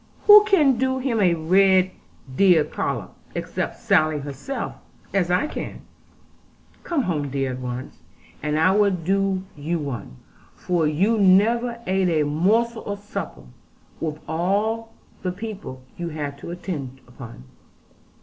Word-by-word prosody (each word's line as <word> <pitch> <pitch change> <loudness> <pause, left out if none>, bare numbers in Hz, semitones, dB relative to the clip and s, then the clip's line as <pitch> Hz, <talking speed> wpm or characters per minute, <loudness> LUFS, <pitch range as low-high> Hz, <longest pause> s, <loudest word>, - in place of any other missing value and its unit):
Who 420 0 +9
can 300 - +4
do 260 0 +1
him 255 -3 -1
a 175 -3 +4
red 185 +3 +4 0.4
deer 180 -4 +5
collop, - - -4 0.2
except - - -3
Sally 155 -8 +3
herself, 145 - -5 0.4
as 185 -3 +1
I 180 +11 +2
can? - - -6 1.0
Come 325 -6 0
home, 150 -7 -2
dear, 135 -1 -1
at 125 - -6
once, 125 0 -6 0.4
and 150 0 -1
I 160 +4 +4
will 205 +1 +4
do 190 +1 0
you 155 +4 -2
one; 125 - -6 0.4
for 175 -3 0
you 195 +9 +2
never 230 +5 +3
ate 190 -1 +1
a 155 -3 +2
morsel 220 +10 +1
of 205 0 -3
supper, 205 +1 -6 0.6
with 155 -2 -3
all 205 +8 -1 0.3
the 180 - -2
people 200 - -7
you 170 -1 -4
had 145 -3 -4
to - - -8
attend 150 -7 -6
upon.' 120 - -11
185 Hz, 140 wpm, -23 LUFS, 150-210 Hz, 1.0 s, Who